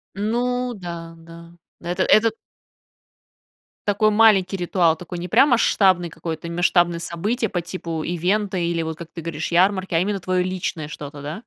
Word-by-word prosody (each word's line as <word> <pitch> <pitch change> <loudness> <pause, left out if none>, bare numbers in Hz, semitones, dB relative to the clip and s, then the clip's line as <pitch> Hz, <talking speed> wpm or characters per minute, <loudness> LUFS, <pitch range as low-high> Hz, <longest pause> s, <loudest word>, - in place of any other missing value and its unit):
Ну, 245 +4 -1
да, 170 -4 -8
да, 170 +1 -14 0.3
это 175 +2 -1
этот 220 0 +4 1.5
Такой 215 +1 +3
маленький 205 -3 +4
ритуал, 175 -2 +2
такой 175 +1 -8
не 175 +1 -5
прям 275 - +5
масштабный 190 -7 +3
какое-то 165 +1 -6
масштабное 175 0 +2
событие, 210 +7 -2
по 175 - -2
типу 170 -3 -5
ивента 190 +3 -1
или 170 -1 0
вот, 160 -1 -5
как 170 -1 -9
ты 165 - -8
говоришь, 160 0 -4
ярмарки, 185 0 +2
а - - +4
именно 200 +2 -1
твоё 185 0 0
личное 180 -4 -3
что-то, 145 -1 -8
да? 150 +5 -5
175 Hz, 155 wpm, -22 LUFS, 165-200 Hz, 1.5 s, прям